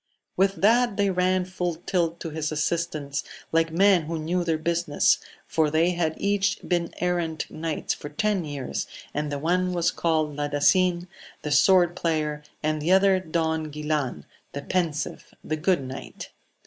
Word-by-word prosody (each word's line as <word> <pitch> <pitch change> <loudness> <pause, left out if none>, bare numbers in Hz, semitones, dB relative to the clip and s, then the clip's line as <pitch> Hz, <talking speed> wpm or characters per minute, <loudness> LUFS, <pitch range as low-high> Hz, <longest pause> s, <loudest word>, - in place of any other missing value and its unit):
With 195 +1 +1
that 230 +1 +4
they 200 -1 +2
ran 185 0 +1
full 180 -2 -3
tilt 170 -1 -1
to 165 - -4
his 155 0 -2
assistance, 155 -2 -2 0.3
like 165 0 +2
men 185 -1 +4
who 165 +1 -3
knew 170 +3 -1
their 165 -2 0
business, 165 -2 +2 0.3
for 160 -2 +1
they 160 +3 +3
had 165 -3 -1
each 200 -1 +1
been 170 -1 0
errant 175 -2 -1
knights 160 -1 -2
for 145 - -8
ten 210 -2 0
years, 135 - -4 0.3
and 150 0 -2
the 145 - -2
one 180 +4 +1
was 175 -1 +1
called 155 -3 0
Ladasin, 175 +5 +2 0.4
the 150 - -3
sword 175 +3 +5
player, 155 -3 -1 0.2
and 155 0 0
the 165 +4 0
other 190 0 +5
Don 160 -2 -1
Guilan 150 -3 -2 0.3
the 140 - -5
pensive, 165 -5 -2
the 155 - -2
good 165 -1 +1
knight. 130 +1 -8
165 Hz, 160 wpm, -25 LUFS, 155-180 Hz, 0.4 s, sword